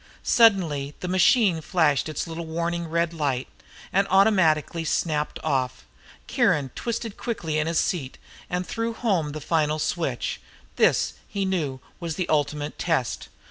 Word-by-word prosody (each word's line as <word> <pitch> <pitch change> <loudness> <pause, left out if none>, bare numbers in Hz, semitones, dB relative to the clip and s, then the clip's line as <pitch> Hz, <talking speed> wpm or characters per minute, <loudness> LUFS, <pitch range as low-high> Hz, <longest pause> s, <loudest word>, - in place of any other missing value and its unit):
Suddenly 165 - +3
the 180 - -4
machine 185 -1 +4
flashed 155 -4 +2
its 155 - -3
little 165 0 -6
warning 170 +1 -2
red 170 +1 0
light 140 -5 -1 0.5
and 195 +1 +3
automatically 180 -5 +3
snapped 155 -1 -1
off. 130 -2 -1 0.4
Kiron 140 -4 +2
twisted 230 -2 -4
quickly 165 -10 -2
in 155 - 0
his 165 0 0
seat 140 -8 -2 0.3
and 180 +1 -2
threw 230 +3 -2
home 185 -11 0
the 155 - -5
final 155 -1 +1
switch. 150 -5 -2 0.3
This, - - +3
he 200 -1 -2
knew, 150 -9 -2 0.2
was 170 -3 -4
the 180 - -2
ultimate 150 0 -1
test. 160 -8 -1
165 Hz, 140 wpm, -25 LUFS, 150-185 Hz, 0.5 s, machine